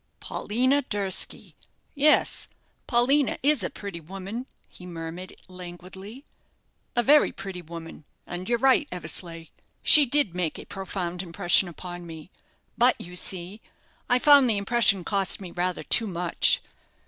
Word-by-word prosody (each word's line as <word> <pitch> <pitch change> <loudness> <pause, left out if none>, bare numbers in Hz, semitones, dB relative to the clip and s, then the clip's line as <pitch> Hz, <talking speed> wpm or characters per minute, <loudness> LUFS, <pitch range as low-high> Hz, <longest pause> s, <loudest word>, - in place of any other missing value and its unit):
"Paulina 255 +6 0
Durski! 200 -7 -4 0.4
Yes, 300 +1 +3 0.4
Paulina 265 +3 +2
is 290 -2 +3
a - - -2
pretty 200 -4 -8
woman," 195 - -7 0.2
he 180 - -14
murmured, 170 +1 -8
languidly; 185 - -11 0.7
"a 240 - +2
very 295 +4 +5
pretty 195 -2 -8
woman; 165 -2 -10 0.2
and 180 +3 -6
you're 240 - +2
right, 270 +4 +3
Eversleigh 165 -1 -4 0.4
she 295 -2 +8
did 285 - +1
make 175 -3 -2
a - - -10
profound 180 -2 -5
impression 175 +1 +2
upon 175 0 -9
me. 160 +2 -11 0.5
But, 245 +1 +4
you 180 +1 -10
see, 185 +3 -6 0.5
I 245 - +4
found 280 -1 +6
the 215 - +2
impression 200 -2 +2
cost 195 +1 0
me 185 -3 -9
rather 180 +1 -2
too 225 - +3
much. 175 -2 +1
190 Hz, 135 wpm, -25 LUFS, 175-240 Hz, 0.7 s, she